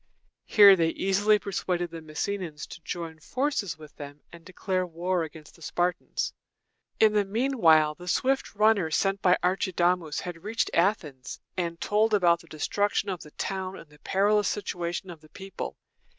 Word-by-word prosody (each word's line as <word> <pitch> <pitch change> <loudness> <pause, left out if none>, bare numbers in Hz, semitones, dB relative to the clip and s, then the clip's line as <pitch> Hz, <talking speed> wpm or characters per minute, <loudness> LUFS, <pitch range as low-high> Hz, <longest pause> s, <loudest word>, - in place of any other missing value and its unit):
Here 200 -3 +8
they 165 -3 +2
easily 205 +5 +2
persuaded 180 -3 -2
the 165 -1 -7
Messenians 155 +1 -4
to - - -10
join 165 -1 -6
forces 240 - -2
with 155 -2 -14
them 145 0 -9
and 170 -1 -12
declare 185 +1 -2
war 180 +1 -2
against 160 -1 -9
the 165 - -20
Spartans. 175 +2 -2 0.7
In 215 -1 +5
the 210 -1 +3
mean 240 +7 -2
while 155 -3 +5
the 175 +3 -13
swift 265 +5 0
runner 210 -5 +3
sent 195 +4 0
by 180 -1 +4
Archidamus 180 -3 +1
had 175 -1 -7
reached 220 +3 -1
Athens, 165 - -1 0.2
and 170 -2 -3
told 215 +1 +2
about 170 -4 +4
the 165 - -17
destruction 205 +6 -1
of 185 -3 -4
the 150 - -11
town 190 +4 -4
and 150 - -14
the 150 - -19
perilous 205 +3 +2
situation 180 -2 -3
of 165 -3 -12
the 155 - -19
people. 195 +2 -7
180 Hz, 165 wpm, -27 LUFS, 165-200 Hz, 0.7 s, Here